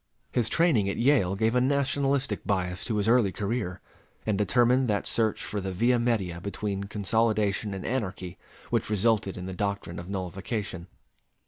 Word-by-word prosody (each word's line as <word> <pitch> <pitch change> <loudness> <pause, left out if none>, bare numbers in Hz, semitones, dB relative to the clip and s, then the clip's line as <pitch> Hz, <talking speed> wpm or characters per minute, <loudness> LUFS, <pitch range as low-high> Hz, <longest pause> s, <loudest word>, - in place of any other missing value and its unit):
His 115 -2 +1
training 135 - +3
at - - -3
Yale 120 -8 +3
gave 110 +3 +1
a 125 - +3
nationalistic 140 0 +1
bias 90 -2 -1
to 115 - -1
his 105 0 0
early 115 -4 +4
career, 100 -3 -3 0.4
and 110 - +1
determined 120 +6 +3
that 105 -2 0
search 110 -2 +1
for 105 - -3
the 95 0 -3
via 120 +6 +2
media 100 -8 0
between 100 0 -3
consolidation 105 0 0
and 95 - -6
anarchy 95 -8 -3 0.3
which - - 0
resulted 105 -2 +1
in 90 - -6
the 95 - -5
doctrine 100 -3 -3
of 85 +1 -8
nullification. 95 0 -4
105 Hz, 160 wpm, -27 LUFS, 95-120 Hz, 0.4 s, early